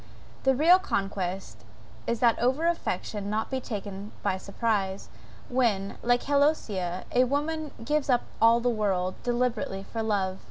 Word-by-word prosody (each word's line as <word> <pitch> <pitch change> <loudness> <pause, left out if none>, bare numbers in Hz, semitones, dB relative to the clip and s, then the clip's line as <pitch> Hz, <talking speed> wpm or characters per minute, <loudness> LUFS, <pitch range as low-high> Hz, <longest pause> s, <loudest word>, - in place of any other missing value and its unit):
The 265 0 +4
real 335 +7 +6
conquest 195 - -3 0.5
is 235 - -1
that 235 -2 +4
over 260 +7 +1
affection 210 - -2
not 215 +4 -2
taken 205 -1 -6
by 190 - +1
surprise 200 -1 -2 0.4
when, 220 -6 0
like 245 0 +2
Heloisa, 220 - +1
a 250 - +4
woman 300 +3 -1 0.2
gives 300 0 0
up 245 -2 +3 0.2
all 230 +1 +6
the 245 - -1
world, 195 -5 0
deliberately, 240 -5 -1
for 225 - -1
love. 195 -4 0
225 Hz, 135 wpm, -27 LUFS, 195-255 Hz, 0.5 s, real